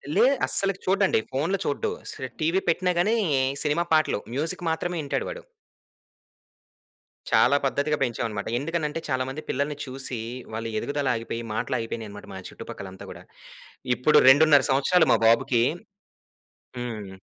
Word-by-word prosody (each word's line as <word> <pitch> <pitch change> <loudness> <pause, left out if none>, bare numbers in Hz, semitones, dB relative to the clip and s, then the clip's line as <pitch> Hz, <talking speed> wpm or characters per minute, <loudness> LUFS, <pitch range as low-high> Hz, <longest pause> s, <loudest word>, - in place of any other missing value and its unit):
లే - - +5 0.2
అస్సలకి 195 -1 0
చూడండి, 195 - +3
ఫోనులు 165 +9 0
అస్ - - -5
చూడడు. 140 - -1 0.5
టీవీ 170 +5 +2
పెట్టినా 180 +2 +1
గాని 215 +6 +3 0.5
సినిమా 150 +3 +1
పాటలు 155 -8 +3 0.2
మ్యూజిక్ 165 +5 -2
మాత్రమే 175 +2 -2
వింటాడు 140 - -2
వాడు. - - -7 1.9
చాలా 140 - +5
పద్ధతిగా 145 +3 0
పెంచామన్నమాట. 115 -4 -3
ఎందుకంటే 160 0 -2
చాలా 130 -1 +1
మంది 150 +4 -6
పిల్లల్ని 145 +1 -1
చూసి 130 -2 -6 0.3
వాళ్ళ 115 +1 -4
ఎదుగుదల 145 -1 -2
ఆగిపోయి, 115 0 -4
మాటలు 130 - -2
ఆగిపోయినాయన్నమాట 110 -2 -6
మా 95 - -7
చుట్టుపక్కల 95 - -9
అంతా 95 - -11
గూడా. - - -11 0.7
ఇప్పుడు 140 +5 +4
2.5 145 0 +6
సంవత్సరాలు 160 +5 +3
మా - - +5
బాబుకి 115 +1 +3 1.2
హ్మ్. 110 -6 -6
145 Hz, 130 wpm, -25 LUFS, 120-165 Hz, 1.9 s, 2.5